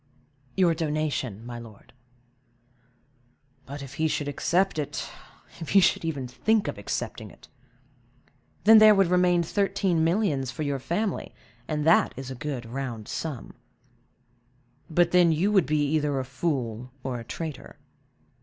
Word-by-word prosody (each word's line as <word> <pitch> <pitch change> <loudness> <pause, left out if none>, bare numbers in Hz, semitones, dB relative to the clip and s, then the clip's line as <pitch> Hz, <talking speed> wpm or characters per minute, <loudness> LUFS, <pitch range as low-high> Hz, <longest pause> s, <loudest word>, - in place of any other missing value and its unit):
"Your 180 -3 +4
donation, 150 - -2
my 120 0 -7
lord." 110 -3 -14 1.7
"But, 140 +1 -7
if 135 0 -10
he 160 +3 0
should 150 -1 -2
accept 175 +4 0
it; 145 - -4 0.5
if 165 - -7
he 200 - +6
should 185 - +3
even 145 -6 -3
think 205 - +1
of - - -4
accepting - - -4
it!" - - -17 1.2
"Then 220 +1 +8
there 215 -1 +8
would 195 -3 +3
remain 180 -1 +3
thirteen 195 -2 0
millions 165 - +1
for 140 +5 -4
your 140 -2 -1
family, 190 - -3 0.3
and 150 -1 -2
that 165 - +4
is 135 0 -6
a - - -3
good 130 -2 -5
round 120 -3 -5
sum." 150 -7 -5 1.4
"But 170 +1 +2
then 180 -2 +5
you 175 +7 +1
would 190 -9 +3
be 150 0 +1
either 150 -2 +1
a 130 - -3
fool 125 -4 -3
or 130 -2 -3
a - - -8
traitor." 155 +4 -7
155 Hz, 145 wpm, -26 LUFS, 130-175 Hz, 1.7 s, Then